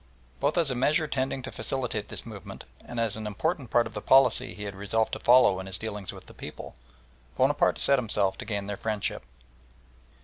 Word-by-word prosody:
Both 145 +5 +1
as 165 -5 +3
a - - -1
measure 150 +6 +2
tending 130 -1 -2
to 130 - -6
facilitate 125 -6 -3
this - - -3
movement 105 -5 -9 0.2
and 120 - -6
as 115 -3 0
an 110 -1 -5
important 135 - -2
part 120 +1 +3
of 110 - -8
the 105 - -5
policy 135 +4 +4
he 105 - -7
had 100 -1 -5
resolved 100 +3 -1
to - - -2
follow 120 -6 +5
in 95 - -7
his 95 -1 -1
dealings 105 -3 -5
with - - -12
the - - -14
people, - - -9 0.6
Bonaparte - - +3
set 140 -1 +3
himself 105 -5 0
to - - -6
gain 100 -2 -3
their 100 0 -4
friendship. 110 -3 -2
110 Hz, 205 wpm, -28 LUFS, 100-130 Hz, 0.6 s, follow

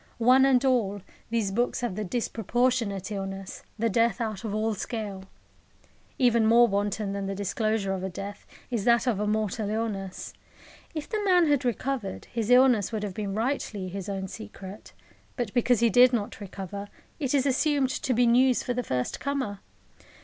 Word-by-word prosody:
One 255 +3 +5
and 265 -1 +4
all, 205 -7 +1 0.3
these 225 -4 0
books 240 +5 0
have 240 -5 -2
the 215 +3 -3
disproportionate 225 -1 -1
illness, 195 -1 -5 0.2
the 230 +1 +1
death 230 +1 +2
out 220 -3 -3
of 220 - -3
all 220 +1 0
scale. 205 -2 -5 0.9
Even 235 -3 +4
more 235 +1 +6
wanton 205 0 -1
than 200 -1 -3
the 195 - -3
disclosure 205 0 -1
of 190 -1 -4
a 190 - -2
death 200 +2 -8 0.2
is 230 -4 -1
that 235 0 +4
of 235 -6 +1
a 210 - 0
mortal 215 0 -1
illness. 210 -4 -3 0.6
If 305 -1 -4
the 430 -2 -2
man 360 -3 +5
had 290 -4 +2
recovered, 245 -3 -2
his 230 -2 -2
illness 250 -5 +5
would 215 -2 -3
have 200 -3 -3
been 200 0 -4
rightly 220 -5 -2
his 195 +1 -6
own 190 -1 -3
secret. 205 -1 -10 0.4
But 240 -6 -3
because 245 -1 +3
he 235 -1 +4
did 250 +3 +6
not 205 -4 -2
recover, 200 +1 -6 0.3
it 280 -2 0
is 270 -1 +2
assumed 275 0 +2
to 260 0 -1
be 245 +1 +4
news 250 +2 +4
for 245 - -1
the 250 - -1
first 125 - -2
comer. 265 -8 -2
220 Hz, 180 wpm, -27 LUFS, 200-245 Hz, 0.9 s, more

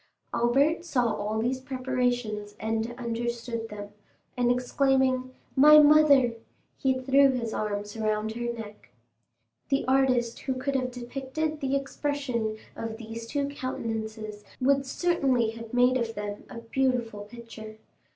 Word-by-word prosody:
Albert 275 +8 +2
saw 250 -9 +1
all 210 +1 -2
these 250 +4 -1
preparations 245 -5 -2
and 225 +2 -2
understood 235 -1 -3
them, 205 -1 -7 0.5
and 245 -1 +2
exclaiming, 255 +1 +2 0.3
"My 300 +3 +9
mother!" 295 -5 +6 0.4
he 260 -1 +1
threw 270 +2 +5
his 235 -4 -2
arms 205 0 -3
around 215 0 -1
her 240 +1 -3
neck. 210 - -9 0.8
The 275 0 +1
artist 255 -3 +2
who 265 -1 -2
could 270 +2 -2
have 255 -1 0
depicted 270 +5 -4
the 270 0 0
expression 275 -5 -2 0.2
of 225 -1 -5
these 230 0 -7
two 280 +2 -1
countenances 220 -5 -5 0.2
would 275 +1 +2
certainly 265 -8 +1
have 230 0 -9
made 250 +1 +4
of 230 -2 -3
them 205 0 -5
a - - -9
beautiful 230 -3 -1
picture. 220 -1 -10
245 Hz, 130 wpm, -27 LUFS, 225-265 Hz, 0.8 s, My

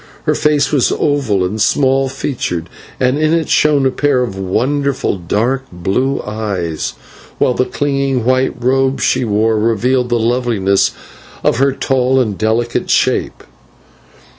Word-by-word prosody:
Her - - +1
face 150 -2 +1
was 140 -5 +2
oval 125 -11 0
and 105 +4 -3
small 135 +3 +2
featured, 90 - -4 0.3
and 130 +3 +1
in 155 +1 +2
it 165 -1 -1
shone 145 -3 +3
a 130 - +2
pair 140 -2 +1
of 115 -6 -5
wonderful 130 +5 -1
dark 120 +10 -1
blue 100 +10 -1
eyes, 90 - -3 0.4
while 125 - +2
the 130 - 0
clinging 135 -4 -1
white 130 +1 +1
robe 135 +2 +1
she - - +1
wore 110 0 +1
revealed 120 +3 +1
the 120 - +1
loveliness 115 -5 +1 0.5
of - - +2
her 135 +2 +3
tall 130 -1 +1
and 110 -6 0
delicate 115 +3 -1
shape. - - 0
125 Hz, 140 wpm, -15 LUFS, 105-135 Hz, 0.5 s, shone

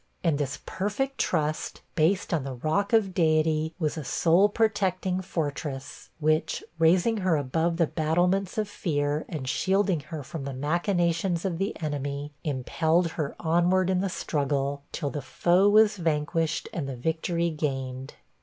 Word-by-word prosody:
And 160 -5 +2
this 140 -2 -2
perfect 265 +8 -2
trust, 155 -2 -1
based 180 +4 +1
on 155 -5 +1
the 135 -1 -5
rock 160 - 0
of 215 -5 +3
Deity, 155 -1 +2
was 155 -2 -1
a - - -5
soul 175 +8 +3
protecting 190 -4 0
fortress, 145 -5 -4
which, 155 +1 +1 0.2
raising 180 +7 +4
her 185 -4 +2
above 160 +5 0
the 170 - +4
battlements 175 +6 0
of 215 -1 0
fear, 150 -6 -1
and 145 -6 -5
shielding 190 +3 +1
her 155 -3 -5
from 150 +2 -6
the 135 -1 -5
machinations 170 +4 0
of 175 -3 -2
the 195 +2 -2
enemy, 145 -1 -3
impelled 160 +4 +1
her 150 -3 -3
onward 175 +3 +2
in 185 -1 +1
the 195 - -1
struggle, 140 -4 -1
till 145 - -3
the 145 - -4
foe 175 +9 +3
was 215 0 +5
vanquished, 160 -1 0
and 145 -5 -3
the 135 - -4
victory 170 +4 -1
gained. 135 -3 -3
165 Hz, 155 wpm, -27 LUFS, 145-185 Hz, 0.2 s, was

